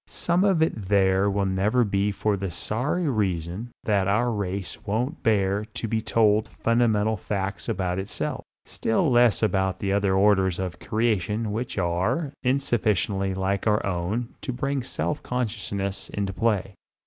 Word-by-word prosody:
Some 175 +2 0
of 190 -5 +3
it 160 - +1
there 95 0 +3
will 100 0 0
never 100 +6 +2
be 100 -1 +1
for 105 +1 0
the 95 -1 -3
sorry 125 - -1
reason 95 - -1
that 100 -3 +1
our 115 +5 +2
race 100 -3 -4
won't 120 +9 -2
bear 100 -2 +2
to 115 - -3
be 110 0 0
told 110 -1 +3
fundamental 110 -2 +1
facts 95 -1 -3
about 90 -1 -1
itself, 95 +1 -3 0.2
still 115 +6 0
less 120 -2 +4
about 95 -3 0
other 100 -1 +2
orders 95 -2 +3
of 90 -2 -4
creation 110 -1 0
which 115 +2 -3
are 95 - 0 0.3
sufficiently 105 -7 0
like 95 +2 -1
our 105 0 +2
own 100 +6 -2
to - - -3
bring 135 +2 -1
self 135 +3 -2
consciousness 100 -5 -3
into 100 -1 -3
play. 105 -2 0
105 Hz, 150 wpm, -25 LUFS, 95-115 Hz, 0.3 s, less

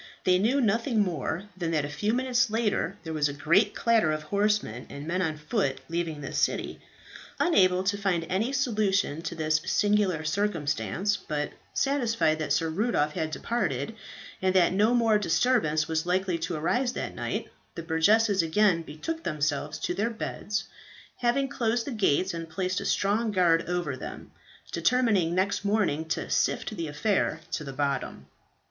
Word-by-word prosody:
They 180 0 +4
knew 240 +8 +2
nothing 230 0 +2
more 170 -1 -2
than 175 -3 -2
that 155 -3 0
a - - -3
few 150 +9 -1
minutes 245 -1 +1
later 220 -1 0
there 160 -2 -5
was 150 -2 +1
a - - -4
great 180 +9 +2
clatter 225 -9 +3
of 155 0 -2
horsemen 200 - 0
and 140 +1 -8
men 180 +3 -1
on 160 -4 -1
foot 145 -3 -1
leaving 165 -3 -2
the 135 - -6
city. - - -1 0.6
Unable 185 - +4
to 200 +1 0
find 180 -4 0
any 205 +8 0
solution 210 - +1
to 170 0 -5
this 155 -1 +1
singular 205 -6 +2
circumstance, 165 - -1
but 150 -1 -3 0.2
satisfied 230 - +1
that 150 -2 -3
Sir 150 +3 +2
Rudolph 160 -6 0
had 160 -3 -2
departed, 155 - -2 0.5
and 185 0 +1
that 180 -1 +4
no 215 +5 +3
more 225 -3 +3
disturbance 165 -6 +2
was 160 +1 -1
likely 180 -1 0
to 170 +1 -3
arise 245 +11 0
that - - -4
night, - - -4 0.2
the 165 - -5
burgesses 195 +5 +3
again 165 +1 +3
betook 165 - -5
themselves 150 0 -1
to - - -1
their 210 +5 0
beds, 220 -2 -3 0.5
having 250 +3 +1
closed 235 -2 -1
the 285 - -4
gates 190 - +1
and 165 -1 -6
placed 185 +2 -2
a - - -6
strong 215 +3 +1
guard 175 -4 +3
over 175 -6 -1
them, - - -8 0.4
determining 195 -3 +2
next 195 +2 0
morning 200 -7 +1
to 160 - -2
sift 215 - 0
the 165 -4 -3
affair 160 +1 0
to 155 - -2
the 140 - -6
bottom. 140 0 -2
185 Hz, 165 wpm, -27 LUFS, 155-215 Hz, 0.6 s, They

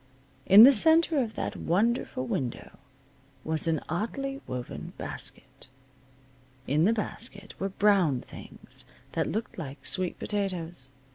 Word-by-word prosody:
In 200 +3 +10
the 275 +3 +9
center 320 +4 +4
of 220 -3 -4
that - - -3
wonderful 200 - 0
window 125 -2 -4 0.6
was 160 +1 0
an 160 -3 +1
oddly 270 - -3
woven 125 -1 -6
basket. - - -7 1.0
In 150 +5 +2
the 215 - +4
basket 210 -2 -5
were 195 - -1
brown 190 -9 +3
things - - -11 0.3
that - - -1
looked 220 -2 -4
like 140 -3 -8
sweet 185 -2 -1
potatoes. 175 -9 -3
195 Hz, 125 wpm, -28 LUFS, 160-225 Hz, 1.0 s, In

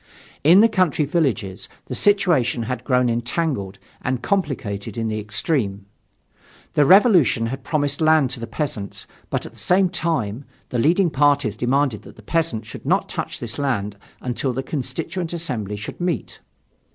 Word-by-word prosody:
In 170 +7 +7
the 225 - +7
country 185 -8 +1
villages, 130 - -1 0.2
the - - -6
situation 160 - +2
had 125 +1 -4
grown 125 -1 +2
entangled 120 - -1 0.2
and 125 -1 -2
complicated 115 - -2
in 115 -1 -1
the 110 0 -2
extreme. 105 -1 -2 0.9
The 145 - +4
Revolution 185 - +5
had 130 +4 -4
promised 145 -1 -1
land 155 -4 +4
to - - -3
the 115 - -5
peasant, 115 -5 -3 0.2
but - - -2
at - - -10
the - - -14
same 185 +1 +3
time, 140 -9 -2 0.3
the 125 - -1
leading 170 +7 +3
parties 145 -6 +2
demanded 125 -1 +1
that - - -14
the 110 - -15
peasant 155 -5 -1
should - - -10
not - - +1
touch - - -4
this 115 +3 -4
land 105 -8 -1 0.3
until 125 +1 -2
the 135 +2 -3
Constituent 155 +6 -4
Assembly 125 - -3
should 105 +10 -7
meet. 175 -2 -2
130 Hz, 160 wpm, -22 LUFS, 115-160 Hz, 0.9 s, In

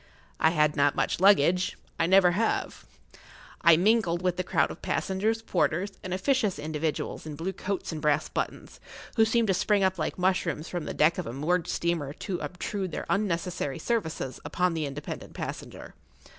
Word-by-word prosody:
I 160 - +5
had 150 -2 +2
not 145 -1 +3
much - - 0
luggage—I 180 -2 +3
never 185 -1 +6
have. 220 +6 -1 0.7
I 170 -1 +7
mingled 185 -3 +2
with 180 -1 +1
the 185 - -2
crowd - - +1
of - - -10
passengers, 220 +4 -1
porters, 185 -1 0
and 185 - -5
officious 205 - +1
individuals 155 +1 -3
in 150 - -6
blue 170 +6 -3
coats 195 0 -3
and 155 -2 -5
brass 150 +1 +2
buttons, - - -5 0.4
who 225 -2 +5
seemed 225 -1 +2
to - - +4
spring 200 +2 +2
up 190 -1 +1
like 155 - -2
mushrooms 180 -3 0
from 175 -3 -4
the - - -5
deck 155 +3 +3
of - - -4
a 115 - -5
moored 165 +6 0
steamer 165 -5 -1
to 180 +2 -4
obtrude 185 +1 -4
their - - -4
unnecessary 175 -7 -1
services 160 - -2
upon 180 -1 0
the 155 -3 -2
independent 140 +2 -7
passenger. - - -7
180 Hz, 170 wpm, -28 LUFS, 155-195 Hz, 0.7 s, I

